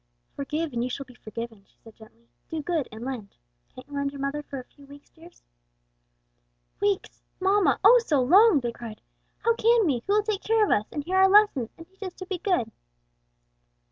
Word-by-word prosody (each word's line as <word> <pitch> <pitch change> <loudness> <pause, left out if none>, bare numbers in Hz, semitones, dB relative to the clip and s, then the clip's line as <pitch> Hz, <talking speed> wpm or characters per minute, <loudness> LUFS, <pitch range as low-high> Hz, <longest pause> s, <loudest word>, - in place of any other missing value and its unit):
"'Forgive, 300 +2 -3
and 235 0 -1
you 250 - -2
shall 275 +2 -5
be 250 - -16
forgiven,'" 230 -2 -8
she - - -34
said 225 -1 -15
gently. 165 - -19 0.2
"'Do 315 -2 -4
good 325 -3 -1
and 220 +2 -9
lend.' 240 -7 -6 0.4
Can't 255 - -11
you 290 - -14
lend 280 0 -1
your 280 - -10
mother 275 +2 -2
for 280 -2 -7
a - - -8
few 280 +2 -20
weeks, 285 +1 -15
dears?" 335 +2 -18 1.4
"Weeks, 405 -2 -1 0.2
mamma! 375 -8 +2
oh, 475 +4 +8
so 300 - +1
long!" 355 - +5
they 240 -1 -2
cried. 230 -2 -9 0.4
"How 465 - +4
can 460 -1 +3
we? 265 -7 0
who 400 - +2
will 420 0 +3
take 420 -2 -2
care 445 -1 +2
of - - -2
us, 210 0 +2
and 295 - -4
hear 370 +5 -1
our 380 0 +6
lessons 395 - +4
and 330 0 -12
teach 385 +2 -32
us 375 -3 -6
to 375 - -8
be 370 -1 -4
good?" 355 - 0
295 Hz, 210 wpm, -26 LUFS, 250-385 Hz, 1.4 s, oh